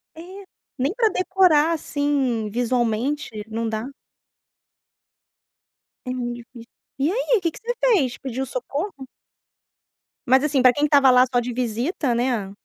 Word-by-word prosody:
É, -, -, -12 dB, 0.6 s
nem 275 Hz, +6 st, 0 dB
para 455 Hz, -2 st, +3 dB
decorar 365 Hz, -5 st, +3 dB
assim 280 Hz, -8 st, -1 dB
visualmente, 245 Hz, +4 st, -1 dB, 0.2 s
não 225 Hz, +1 st, -3 dB
dá. 220 Hz, +4 st, -4 dB, 2.2 s
É 250 Hz, -, -3 dB
muito 240 Hz, -1 st, -3 dB
difícil. 240 Hz, 0 st, -13 dB, 0.3 s
E 280 Hz, +4 st, +1 dB
aí -, -, +1 dB
que 335 Hz, -2 st, 0 dB
que -, -, -13 dB
você 475 Hz, +2 st, -3 dB
fez 360 Hz, -, +2 dB
pediu 265 Hz, 0 st, -4 dB
socorro? 275 Hz, -, -5 dB, 1.2 s
Mas 260 Hz, +2 st, +4 dB
assim 290 Hz, -3 st, +1 dB
para 255 Hz, -1 st, +6 dB
quem 290 Hz, +3 st, +1 dB
estava 285 Hz, -2 st, +5 dB
lá 250 Hz, 0 st, +6 dB
só 245 Hz, -, +2 dB
de 245 Hz, 0 st, -4 dB
visita, 245 Hz, -, -1 dB
né. 235 Hz, -5 st, -1 dB
260 Hz, 140 wpm, -22 LUFS, 240-300 Hz, 2.2 s, para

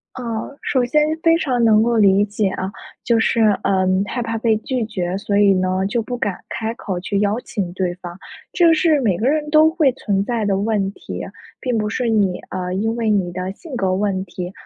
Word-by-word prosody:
呃， 235 Hz, +2 st, -5 dB
首 255 Hz, -3 st, +1 dB
先 300 Hz, +5 st, +2 dB, 0.2 s
非 330 Hz, 0 st, +5 dB
常 255 Hz, -7 st, 0 dB
能 220 Hz, -1 st, +5 dB
够 235 Hz, 0 st, +1 dB
理 200 Hz, -1 st, +5 dB
解 205 Hz, -1 st, -1 dB
啊， 190 Hz, +1 st, -4 dB, 0.3 s
就 235 Hz, -1 st, +2 dB
是， 225 Hz, +1 st, +2 dB, 0.2 s
呃， 190 Hz, -1 st, +2 dB, 0.2 s
害 245 Hz, -, -3 dB
怕 225 Hz, 0 st, -3 dB
被 220 Hz, -1 st, +2 dB
拒 245 Hz, +1 st, -2 dB
绝， 185 Hz, -4 st, -3 dB
所 200 Hz, 0 st, -1 dB
以 200 Hz, -1 st, +5 dB
呢， 185 Hz, 0 st, 0 dB
就 235 Hz, +3 st, -1 dB
不 245 Hz, +2 st, -5 dB
敢 205 Hz, -6 st, -3 dB
开 225 Hz, 0 st, -3 dB
口 190 Hz, -6 st, -4 dB
去 200 Hz, +2 st, -2 dB
邀 210 Hz, +3 st, +1 dB
请 190 Hz, -8 st, -4 dB
对 180 Hz, -1 st, -1 dB
方。 175 Hz, -1 st, -9 dB, 0.3 s
这 340 Hz, -2 st, +4 dB
是 315 Hz, -2 st, +3 dB
每 200 Hz, -8 st, +1 dB
个 230 Hz, +7 st, 0 dB
人 300 Hz, +1 st, 0 dB
都 310 Hz, +1 st, +6 dB
会 320 Hz, -5 st, +2 dB
存 200 Hz, -6 st, -1 dB
在 235 Hz, -2 st, -1 dB
的 195 Hz, -1 st, +1 dB
问 200 Hz, -1 st, 0 dB
题， -, -, -7 dB, 0.4 s
并 250 Hz, -3 st, -1 dB
不 210 Hz, -1 st, 0 dB
是 240 Hz, +1 st, -1 dB
你 200 Hz, -5 st, +1 dB
呃， 180 Hz, -1 st, -4 dB
因 220 Hz, +4 st, -1 dB
为 230 Hz, -2 st, -1 dB
你 190 Hz, -4 st, +1 dB
的 185 Hz, +1 st, -4 dB
性 290 Hz, -, -9 dB
格 190 Hz, -3 st, 0 dB
问 195 Hz, -1 st, -1 dB
题 180 Hz, 0 st, -6 dB
215 Hz, 230 characters per minute, -20 LUFS, 190-240 Hz, 0.4 s, 都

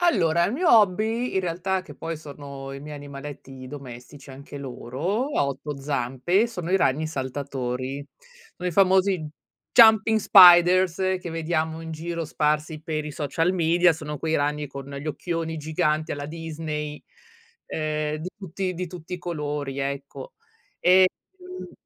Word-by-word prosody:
Allora, 170 Hz, -, +3 dB
il 205 Hz, -, 0 dB
mio 335 Hz, +5 st, +1 dB
hobby, 220 Hz, +3 st, +3 dB
in 190 Hz, -, +2 dB
realtà 185 Hz, +2 st, -1 dB
che 185 Hz, -, -12 dB
poi 165 Hz, -1 st, -5 dB
sono, 140 Hz, -2 st, -9 dB
i 135 Hz, -, -7 dB
miei 150 Hz, 0 st, -8 dB
animaletti 140 Hz, -2 st, -9 dB
domestici, 135 Hz, 0 st, -10 dB
anche 140 Hz, +2 st, -10 dB
loro, 140 Hz, -, -3 dB
a 140 Hz, -, +3 dB
8 140 Hz, +1 st, -5 dB
zampe, 140 Hz, -, 0 dB
sono 180 Hz, -7 st, -6 dB
i 190 Hz, -, +4 dB
ragni 155 Hz, -3 st, +1 dB
saltatori. 135 Hz, -1 st, -4 dB, 0.5 s
Sono 180 Hz, 0 st, -3 dB
i -, -, -4 dB
famosi 190 Hz, +1 st, +4 dB
j 155 Hz, -, -6 dB, 0.5 s
jumping 220 Hz, -1 st, +7 dB
spiders 180 Hz, -2 st, +7 dB, 0.2 s
che 180 Hz, -, -6 dB
vediamo 160 Hz, 0 st, -2 dB
in 160 Hz, -, -7 dB
giro 165 Hz, +1 st, -4 dB
sparsi 150 Hz, +1 st, -1 dB
per 155 Hz, -1 st, -3 dB
i -, -, -5 dB
social 165 Hz, +5 st, 0 dB
media. 175 Hz, 0 st, +4 dB
Sono 150 Hz, -2 st, -6 dB
quei 160 Hz, +2 st, 0 dB
ragni 150 Hz, +1 st, -1 dB
con 140 Hz, 0 st, -9 dB
gli 140 Hz, +2 st, -7 dB
occhioni 165 Hz, +1 st, -3 dB
giganti, 155 Hz, 0 st, -1 dB
alla 145 Hz, 0 st, -5 dB
Disney, 155 Hz, -2 st, -5 dB, 0.6 s
ehm, 155 Hz, -1 st, -2 dB
d 160 Hz, -, -6 dB
tutti 190 Hz, 0 st, -4 dB
di 180 Hz, +1 st, -4 dB
tutti 175 Hz, 0 st, -8 dB
i -, -, -6 dB
colori, 150 Hz, -5 st, -4 dB
ecco, 140 Hz, 0 st, -5 dB, 0.4 s
e, 185 Hz, +1 st, +6 dB, 0.3 s
mhmm 365 Hz, 0 st, -9 dB
155 Hz, 155 wpm, -25 LUFS, 145-180 Hz, 0.6 s, jumping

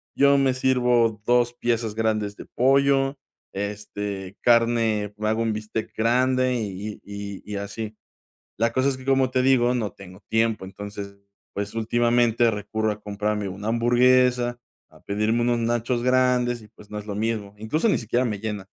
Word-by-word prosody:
Yo 140 Hz, 0 st, +5 dB
me 135 Hz, -1 st, +3 dB
sirvo 125 Hz, -4 st, +2 dB
2 120 Hz, 0 st, +3 dB
piezas 115 Hz, -2 st, -1 dB
grandes 110 Hz, -2 st, 0 dB
de -, -, -9 dB
pollo, 135 Hz, +2 st, +2 dB, 0.4 s
este, 100 Hz, -1 st, -5 dB
carne, 115 Hz, -3 st, +2 dB
hago 110 Hz, +1 st, 0 dB
un 110 Hz, -1 st, 0 dB
bistec 110 Hz, +1 st, -5 dB
grande 130 Hz, +2 st, +2 dB
y 115 Hz, -3 st, -1 dB, 0.4 s
y 100 Hz, -1 st, -7 dB
y 105 Hz, -, -7 dB
y -, -, -3 dB
así. 105 Hz, +2 st, -5 dB, 0.6 s
La 115 Hz, +2 st, +2 dB
cosa 130 Hz, +2 st, +2 dB
es 135 Hz, -, -3 dB
que, 130 Hz, -, -12 dB
como 135 Hz, -1 st, +3 dB
te 130 Hz, -, +2 dB
digo, 125 Hz, -2 st, +4 dB
no 110 Hz, -4 st, -2 dB
tengo 95 Hz, 0 st, -13 dB
tiempo, 110 Hz, -2 st, +1 dB
entonces, 100 Hz, +1 st, -8 dB, 0.4 s
pues, 100 Hz, 0 st, -4 dB
últimamente 120 Hz, +1 st, +2 dB
recurro 110 Hz, +1 st, -2 dB
a 105 Hz, 0 st, -7 dB
comprarme 105 Hz, 0 st, -2 dB
una 100 Hz, +3 st, -6 dB
hamburguesa, 120 Hz, +1 st, +3 dB, 0.3 s
a -, -, -19 dB
pedirme 105 Hz, +3 st, 0 dB
unos 120 Hz, 0 st, +1 dB
nachos 120 Hz, +1 st, 0 dB
grandes 125 Hz, -1 st, +2 dB
y, 105 Hz, -, -14 dB
pues, 105 Hz, -1 st, -17 dB
no 105 Hz, -, -4 dB
es 105 Hz, -, -10 dB
lo 100 Hz, -, -4 dB
mismo, 105 Hz, -2 st, -2 dB
incluso 110 Hz, -, 0 dB
ni -, -, +3 dB
siquiera 120 Hz, +2 st, 0 dB
me 105 Hz, -4 st, -2 dB
llena. 105 Hz, -2 st, -4 dB
115 Hz, 170 wpm, -24 LUFS, 105-125 Hz, 0.6 s, Yo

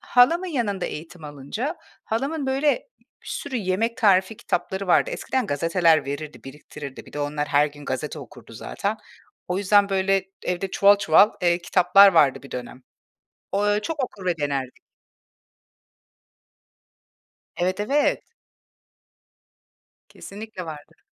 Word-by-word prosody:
halamın 330 Hz, +9 st, +3 dB
yanında 220 Hz, -, -2 dB
eğitim 165 Hz, +1 st, -8 dB
alınca, 150 Hz, -, -5 dB, 0.3 s
halamın, 275 Hz, +6 st, -2 dB
böyle, 285 Hz, -, 0 dB, 0.3 s
bir -, -, -19 dB
sürü 270 Hz, -3 st, -4 dB
yemek 215 Hz, +3 st, -1 dB
tarifi 200 Hz, -2 st, +3 dB
kitapları 195 Hz, -1 st, -3 dB
vardı. 185 Hz, -, +3 dB
Eskiden 265 Hz, -, -2 dB
gazeteler 165 Hz, +1 st, +2 dB
verirdi, 145 Hz, +2 st, -6 dB
biriktirirdi, 140 Hz, 0 st, -10 dB
bir -, -, -15 dB
de 145 Hz, -, -6 dB
onlar 145 Hz, 0 st, -2 dB
her 145 Hz, 0 st, +4 dB
gün 145 Hz, 0 st, -11 dB
gazete 150 Hz, +4 st, -4 dB
okurdu 120 Hz, -3 st, -13 dB
zaten. 200 Hz, -, -4 dB, 0.5 s
O 180 Hz, +1 st, -1 dB
yüzden, 205 Hz, 0 st, +4 dB
böyle, 195 Hz, 0 st, +1 dB, 0.2 s
evde 180 Hz, +2 st, -2 dB
çuval 200 Hz, +2 st, +5 dB
çuval, 200 Hz, +2 st, +5 dB
eee, 175 Hz, -1 st, +3 dB
kitaplar 180 Hz, +3 st, +6 dB
vardı 145 Hz, -5 st, +3 dB
bir 140 Hz, -, -13 dB
dönem. 125 Hz, +1 st, -7 dB, 0.7 s
Ooo, 200 Hz, +1 st, +1 dB
ö 205 Hz, 0 st, +2 dB
çok 300 Hz, +1 st, -2 dB
okur 200 Hz, -6 st, -10 dB
ve 175 Hz, -2 st, +1 dB
denerdik. 140 Hz, -4 st, -2 dB, 2.8 s
Evet, 185 Hz, +3 st, -1 dB
evet. 280 Hz, +8 st, +1 dB, 1.9 s
Kesinlikle 205 Hz, -3 st, -9 dB
vardır. 150 Hz, -2 st, -11 dB
185 Hz, 130 wpm, -23 LUFS, 150-215 Hz, 2.8 s, kitaplar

